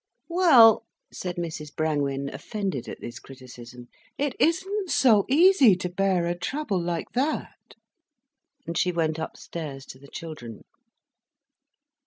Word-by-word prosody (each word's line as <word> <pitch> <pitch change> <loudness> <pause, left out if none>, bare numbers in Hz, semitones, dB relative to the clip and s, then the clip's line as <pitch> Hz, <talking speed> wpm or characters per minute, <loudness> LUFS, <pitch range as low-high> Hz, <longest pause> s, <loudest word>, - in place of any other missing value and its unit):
"Well—" 265 - +6 0.3
said 180 -1 -5
Mrs 155 -3 -6
Brangwen, 140 -3 -1
offended 195 - -4
at - - -9
this 120 +2 -8
criticism, 125 -2 -12 0.3
"it 285 -2 -1
isn't 380 +4 0
so 220 -10 +4
easy 295 - +6
to 180 0 -4
bear 185 -1 +1
a 170 - 0
trouble 210 - -2
like 170 -1 -3
that." 275 +5 -3 0.9
And 165 +1 -5
she 180 - +1
went 160 -2 -1
upstairs 150 -3 -7
to 130 - -12
the 140 - -15
children. 140 -9 -9
175 Hz, 125 wpm, -25 LUFS, -, 0.9 s, Well